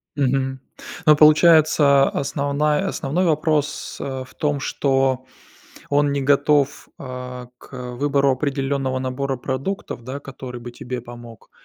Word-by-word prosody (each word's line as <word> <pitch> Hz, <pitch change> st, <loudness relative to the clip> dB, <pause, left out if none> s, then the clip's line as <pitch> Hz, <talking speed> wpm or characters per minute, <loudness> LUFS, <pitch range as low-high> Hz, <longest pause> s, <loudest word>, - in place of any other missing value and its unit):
Мгм. 135 Hz, -1 st, 0 dB, 0.5 s
Но 155 Hz, -1 st, +7 dB
получается, 150 Hz, -2 st, +5 dB
основная 145 Hz, +5 st, 0 dB
основной 175 Hz, +3 st, -1 dB
вопрос, 155 Hz, -2 st, 0 dB
а, 130 Hz, -1 st, -4 dB
в -, -, -19 dB
том, 145 Hz, -2 st, -1 dB
что 135 Hz, -2 st, 0 dB, 0.7 s
он 145 Hz, 0 st, +2 dB
не 140 Hz, -1 st, -1 dB
готов, 145 Hz, 0 st, +2 dB
а, 125 Hz, -1 st, -7 dB
к -, -, -17 dB, 0.2 s
выбору 140 Hz, +1 st, +2 dB
определённого 135 Hz, -1 st, -1 dB
набора 130 Hz, +1 st, -2 dB
продуктов, 135 Hz, -, -4 dB
да, 130 Hz, +4 st, -6 dB
который 125 Hz, -3 st, -9 dB
бы 120 Hz, 0 st, -9 dB
тебе 125 Hz, +1 st, -6 dB
помог? 120 Hz, -2 st, -12 dB
140 Hz, 125 wpm, -21 LUFS, 130-145 Hz, 0.7 s, Но